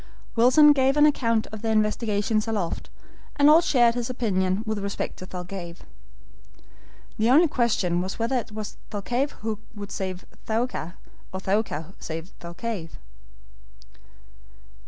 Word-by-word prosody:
Wilson 275 +6 +7
gave 270 0 +2
an 295 - +7
account 230 -7 +2
of 215 -1 -7
their 225 0 0
investigations 215 0 +1
aloft, 205 -7 -2 0.5
and 290 +1 +6
all 320 +2 +7
shared 240 -7 +4
his 240 0 -3
opinion 195 -5 0
with 220 -1 -2
respect 200 0 -4
to 185 - -9
Thalcave. 180 -1 -7 1.4
The 220 +2 +3
only 310 +7 +6
question 215 - +1
was 185 +1 -4
whether 230 +3 0
it 230 -2 -4
was 215 -1 -6
Thalcave 245 +7 -1
who 220 -2 -2 0.2
would 205 -1 -7
save 185 -1 -4 0.2
Thaouka, 220 -6 -2 0.4
or 190 - -4
Thaouka 190 -4 -1
save 165 +3 -6
Thalcave. 170 0 -5
215 Hz, 135 wpm, -25 LUFS, 190-240 Hz, 1.4 s, Wilson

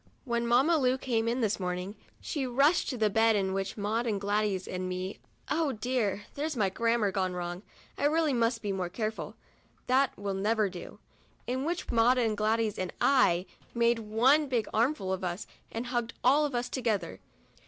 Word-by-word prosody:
When 235 -2 -1
Mamma 270 +8 +4
Lu 255 -1 +2
came 230 -4 -1
in 240 +2 0
this 215 -3 0
morning, 180 +2 -3 0.2
she 280 -5 -3
rushed 275 +7 +3
to 255 - -3
the 220 -2 +3
bed 225 +1 +4
in 190 -2 0
which 195 +2 -3
were 205 - -5
Maud 225 +3 0
and 210 -3 0
Gladys 205 -2 0
and 185 0 -3
me 185 +2 -4 0.3
(oh 310 -3 0
dear! 215 -3 -1
there's 300 -1 -3
my 200 -3 +2
grammar 230 0 +1
wrong! 180 -2 -2 0.4
I - - +1
really 310 0 +2
must 230 -1 +1
be 205 - -1
more 185 -2 -2
careful; 215 +3 -4 0.5
that 260 +1 +2
will 200 -1 -3
never 210 +1 +1
do) 180 -1 -9 0.3
— - - -35
in 260 +3 -2
which 345 +2 -2
were - - -2
Maud 240 +3 +5
and 225 -3 +1
Gladys 215 0 0
and 185 -1 -2
I, 190 -10 +4 0.3
made 235 0 +3
one 245 +8 +3
big 235 -4 0
armful 220 -5 +1
of 190 - -4
us, 180 +2 -3 0.3
and 230 +2 -4
hugged 240 -2 -2
all 280 +5 +5
of 275 - -6
us 240 0 -1
together. 235 -6 -2
225 Hz, 195 wpm, -29 LUFS, 195-255 Hz, 0.5 s, Maud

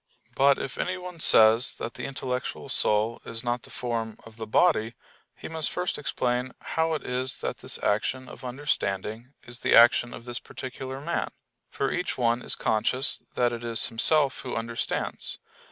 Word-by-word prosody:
But 140 0 +4
if 135 - -5
anyone 180 -1 -4
says 115 -4 +6
that 115 - -5
the - - -6
intellectual 130 -2 -4
soul 110 +2 +2
is 115 +1 -5
not 120 0 -1
the - - -15
form 115 -3 -3
of 115 0 -14
the 110 -1 -6
body 115 -4 +2 0.4
he - - -8
must 160 -1 +2
first 180 -3 -2
explain 125 -2 -1
how 160 0 -1
it - - -6
is 125 +1 -1
that - - -3
this - - -2
action 130 +5 0
of 130 - -12
understanding 120 -3 -2
is 120 +1 -5
the - - +3
action 120 +1 +6
of 120 - -10
this 120 0 +3
particular 130 +1 -7
man; 170 +4 -2 0.4
for 140 - -2
each 180 0 -2
one 120 -1 +1
is - - +1
conscious 130 +5 0
that 120 -1 +2
it 120 0 -6
is 115 -1 +2
himself 140 +5 +3
who 130 - -5
understands. 115 +1 -3
125 Hz, 170 wpm, -27 LUFS, 115-135 Hz, 0.4 s, says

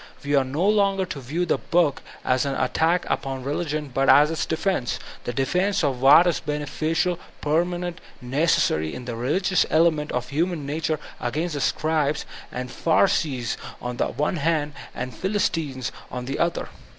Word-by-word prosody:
We 145 +1 -2
are 140 -2 +5
no 145 +9 0
longer 200 -2 +3
to 150 - -6
view 155 +8 -2
the - - +1
book 165 -4 +1 0.2
as 125 0 +2
an 140 -1 -1
attack 160 +7 +1
upon 135 -1 -2
re 140 +2 -2
ligion 150 -3 -3
but 135 +1 +2
as 150 +2 +7
its 160 - -2
defense, 160 -5 0
— - - -17
the - - -1
defense 180 - +1
of 135 -4 0
what 145 +6 +8
is 175 -3 +1
bene 150 0 -3
ficial, 165 +4 0 0.2
permanent, 175 +3 -1 0.2
necessary, 130 - +1
in 125 - -7
the 120 -2 -4
religious 170 +10 +2
element 155 -2 +2
of 125 +2 -3
Iranian 165 -1 0
nature 155 +1 -1 0.2
against 155 +8 -2
the 145 - -2
scribes 155 -1 0 0.3
and 125 0 -5
pharisees 150 -7 +1 0.2
on 125 0 -5
the - - +1
one 150 +4 -1
hand 150 -1 0 0.2
and 125 0 -4
the 190 - -3
philbtines 150 - -1 0.2
on 125 0 -5
the 135 +2 -3
other. 170 0 0
150 Hz, 175 wpm, -24 LUFS, 135-170 Hz, 0.3 s, what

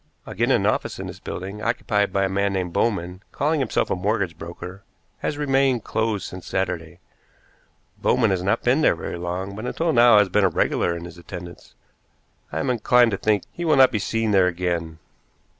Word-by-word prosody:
Again, - - -1
an - - +3
office - - 0
in - - -6
this - - -8
building, 95 +3 -6
occupied 105 -3 0
by 100 0 +1
a - - +2
man 100 +1 0
named 90 -3 -2
Bowman, 95 -4 -1
calling 150 +2 0
himself 130 -5 0
a - - +2
mortgage 95 -2 -1
broker, 85 +4 -9 0.4
has 145 - -3
remained 135 -5 +2
closed 110 -3 -1
since 90 -1 -9
Saturday. 85 -3 -3 1.0
Bowman 115 -5 +2
has 95 -2 0
not 100 +5 0
been 130 +5 +3
there - - +4
very 85 - -6
long, 90 +3 -4
but 110 +4 -5
until 165 +4 0
now 120 -3 +7
has 105 -1 +5
been 95 +1 +3
regular 85 0 0
in 85 - -8
his 90 0 -11
attendance. 85 -1 -10 0.8
I 80 - -4
am 80 - 0
inclined 120 0 +4
to 95 - -1
think 105 -2 +1
he 175 - -6
will 155 -3 +3
not 130 -1 +7
be 110 - -1
seen 115 +2 -1
there 95 -2 +4
again." 85 -2 -2
100 Hz, 190 wpm, -23 LUFS, 90-115 Hz, 1.0 s, now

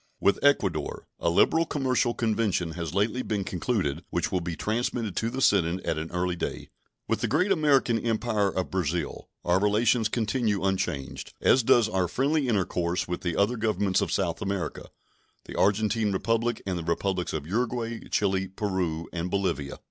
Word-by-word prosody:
With 100 - +2
Ecuador 95 - +1
a 85 - +1
liberal 160 - +3
commercial 130 -4 +1
convention 110 -7 0
has 85 -1 -5
lately 110 +5 +1
been 105 -5 -2
concluded, 90 - -1
which 85 - -1
will 90 - 0
be 85 -1 -4
transmitted 110 -1 -2
to 115 - 0
the 130 +2 -2
Senate 90 -2 +3
at 80 - 0
an 80 +1 -5
early 90 0 -1
day. 85 - -4 0.4
With - - 0
the - - +1
great 180 +8 +2
American 140 -9 +3
Empire 110 -3 0
of 95 -1 -3
Brazil 85 -4 -2 0.2
our 90 +1 +3
relations 110 +2 +2
continue 110 -3 0
unchanged, 90 -8 -2
as 130 - +4
does 115 -1 +4
our 95 -4 0
friendly 140 - +1
intercourse 90 -5 0
with 90 0 -3
the 85 -2 -2
other 110 +5 +2
Governments 105 -3 +1
of - - -1
South 85 -4 -1
America 100 -3 -3 0.6
the - - -8
Argentine 105 +1 +2
Republic 115 +4 0
and 90 -3 -2
the - - -5
Republics 90 +2 -1
of 75 -2 -4
Uruguay, 115 +4 -2
Chili, 95 -2 +1
Peru, 95 -5 -2
and 85 +1 -2
Bolivia. 90 -8 -1
100 Hz, 170 wpm, -27 LUFS, 90-115 Hz, 0.6 s, as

